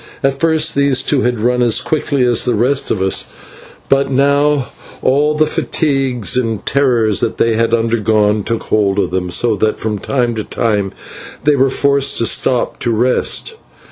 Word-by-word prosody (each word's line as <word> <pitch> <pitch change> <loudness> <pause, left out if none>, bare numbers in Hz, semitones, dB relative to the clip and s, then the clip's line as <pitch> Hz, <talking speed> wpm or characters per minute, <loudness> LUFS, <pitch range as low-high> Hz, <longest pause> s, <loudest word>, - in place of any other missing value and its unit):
At 135 0 0
first 160 0 +2
these 140 -2 +2
two 140 -1 0
had 120 -2 -1
run 125 +2 0
as 120 -3 +3
quickly 145 -3 -1
as 120 -2 +2
the 125 -2 0
rest 130 +6 0
of 95 - -1
us, 95 - +1 0.6
but 135 0 +1
now 140 +1 +1 0.4
all 145 +3 +2
the 155 0 +2
fatigues 135 - -1
and 115 -4 -2
terrors 120 -7 +1
that 115 - -2
they 115 - +1
had 115 +1 0
undergone 110 -2 +1
took 115 +1 -3
hold 100 -2 0
of 100 - -1
them, 90 -1 -2
so 110 +6 +2
that 110 +2 0
from 105 -2 -3
time 120 +1 -1
to 110 - -2
time 105 -4 -2 0.5
they 150 +1 +3
were 135 0 +2
forced 140 +1 +1
to 115 - +1
stop 125 +2 0
and 115 -3 -1
rest. 130 - 0
125 Hz, 175 wpm, -15 LUFS, 110-140 Hz, 0.6 s, as